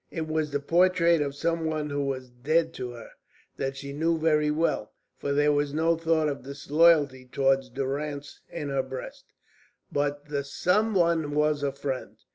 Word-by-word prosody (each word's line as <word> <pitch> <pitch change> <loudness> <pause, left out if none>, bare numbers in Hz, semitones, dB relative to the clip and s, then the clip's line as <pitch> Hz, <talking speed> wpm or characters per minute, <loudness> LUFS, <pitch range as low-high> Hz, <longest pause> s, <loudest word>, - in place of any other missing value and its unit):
It 160 -2 -4
was 155 -1 -1
the 145 0 -1
portrait 170 +1 +3
of 140 -1 -2
some 165 +3 -1
one 155 -2 -2
who 145 0 -1
was 130 -2 -4
dead 155 +7 +1
to 125 - -5
her 115 -2 -11 0.5
that 135 0 -3
she 140 0 -6
knew 165 +3 +1
very 155 -1 +2
well, 150 -8 0 0.3
for 140 - -2
there 145 +1 +3
was 145 0 0
no 165 +1 +3
thought 165 -1 +1
of 145 - -3
disloyalty 145 -1 +3
toward 135 0 +3
Durrance 140 +1 -4
in 150 -4 -5
her 135 -1 +1
breast 130 0 -8 0.7
but 145 0 -1
the 145 -1 -2
some 195 +10 +1
one 165 -4 +2
was 150 -1 +2
a 140 -1 0
friend. 135 -1 -5
145 Hz, 175 wpm, -27 LUFS, 140-160 Hz, 0.7 s, portrait